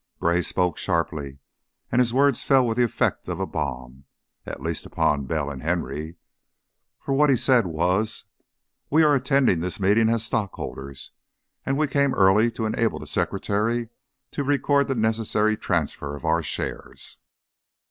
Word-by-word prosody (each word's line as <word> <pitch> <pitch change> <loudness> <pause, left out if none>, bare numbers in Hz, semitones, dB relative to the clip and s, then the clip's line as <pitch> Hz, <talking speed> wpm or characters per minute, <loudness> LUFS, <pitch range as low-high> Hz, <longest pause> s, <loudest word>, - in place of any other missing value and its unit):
Gray 85 +1 +2
spoke 90 0 -1
sharply, 80 -6 -2 0.5
and 125 - +3
his 120 -2 +1
words 140 +1 +3
fell 135 -2 +4
with 115 0 -1
the - - +5
effect 120 - -1
of - - -3
a - - 0
bomb, 65 -2 -5 0.4
at - - -6
least - - -3
upon 70 -2 0
Bell 75 -2 -2
and 65 -2 -8
Henry, 80 -1 -3 0.8
for 135 - -3
what 145 +2 +4
he 135 - +5
said 125 -4 +3
was: 90 +8 -1 0.6
"We 160 +3 +4
are 150 -1 +5
attending 135 - +2
this 90 +5 -4
meeting 105 +4 +3
as 115 -1 0
stockholders, 70 - -5 0.6
and 135 0 +1
we 155 - +2
came 140 -2 +1
early 100 +4 +4
to 115 -1 -4
enable 110 +1 0
the - - -8
secretary 115 +3 -1 0.4
to 145 - -3
record 140 0 +2
the 135 - -1
necessary 110 -1 +1
transfer 80 -7 -2
of 70 - -9
our 80 +1 +2
shares." 70 - -5
110 Hz, 155 wpm, -24 LUFS, 80-125 Hz, 0.8 s, the